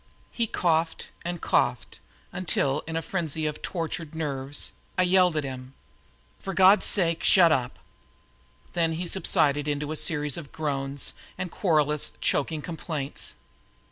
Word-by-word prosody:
He 230 -1 0
coughed 165 -4 0
and 175 0 -3
coughed - - 0 0.3
until, 150 -6 0
in 160 - -4
a 165 - -1
frenzy 160 -3 -2
of 150 0 -3
tortured 165 -2 -4
nerves, 140 -3 -2 0.3
I 185 - +4
yelled 180 -1 +4
to 155 - +1
him: 130 -1 -7 0.6
"For 195 -1 -5
God's 190 +2 +6
sake, 170 -4 +2
shut 175 -4 +6
up!" 130 -4 0 1.0
Then 165 -2 +1
he 170 +3 -3
subsided 155 -5 +2
into 145 0 -2
a - - -2
series 150 -3 +1
of 150 -5 -9
groans 140 -2 -2 0.2
and 185 -2 -4
querulous, 150 -5 +1
choking 150 +1 0
complaints. 155 -4 -3
160 Hz, 140 wpm, -26 LUFS, 145-175 Hz, 1.0 s, God's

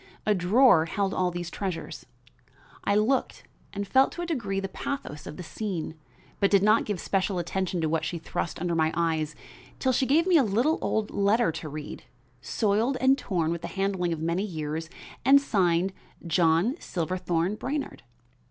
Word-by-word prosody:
A 215 - +4
drawer 190 -1 +5
held 195 +2 -1
all 185 -1 +1
these 175 -1 -5
treasures. 190 -4 -5 0.8
I 200 - +2
looked 225 +6 +1 0.3
and 200 0 -4
felt 265 +6 +4
to 345 - -4
a - - -2
degree 230 - -2
the 195 - -3
pathos 185 - -5
of - - -8
the 180 - -6
scene; 180 -2 -4 0.5
but 200 - +3
did 200 -1 +4
not 215 +2 +4
give 205 -4 -3
special 190 +1 0
attention 180 0 -2
to 160 - +1
what 160 +1 0
she 170 +1 -3
thrust 165 +1 -4
under 175 0 -1
my 160 -1 +2
eyes 160 -2 0 0.4
till 260 - +1
she 260 +1 +1
gave 315 +5 +4
me 365 -3 +5
a 285 - +5
little 240 +9 +1
old 220 -1 -1
letter 205 +1 +2
to 155 -1 -6
read, 150 0 -7 0.4
soiled 220 - +1
and 265 +1 +5
torn 165 -4 -1
with 170 -1 -3
the - - -5
handling 195 -3 -1
of 165 - -2
many 170 +3 0
years 160 -4 -4 0.3
and 280 +1 +7
signed 190 -7 +1 0.3
John 170 - +2
Silverthorn 180 +1 -1
Brainard. 275 +6 -4
190 Hz, 180 wpm, -27 LUFS, 170-220 Hz, 0.8 s, and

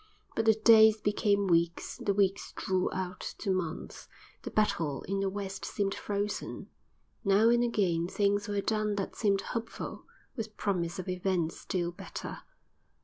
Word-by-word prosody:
But 225 - 0
the 220 -1 +6
days 220 0 +7
became 205 -1 +2
weeks, 170 -1 +1
the 200 - 0
weeks 195 -1 +1
drew 185 -1 0
out 185 -1 -4 0.2
to 200 - -1
months; 180 -3 -3 0.3
the - - -5
battle 165 -9 0
in 195 +1 -2
the 195 0 +1
West 195 -1 -5
seemed 195 -2 -1
frozen. 205 0 -3 0.5
Now 205 +2 +5
and 240 0 +4
again 180 -8 +1
things 205 +2 +1
were 205 -1 0
done 215 0 0
that 195 -1 -3
seemed 200 -3 +2
hopeful, 230 -1 -5 0.3
with 220 -4 -6
promise 180 -3 -1
of 185 - -5
events 180 -2 -1
still 175 -3 -2
better. 175 - -7
200 Hz, 150 wpm, -30 LUFS, 185-210 Hz, 0.5 s, days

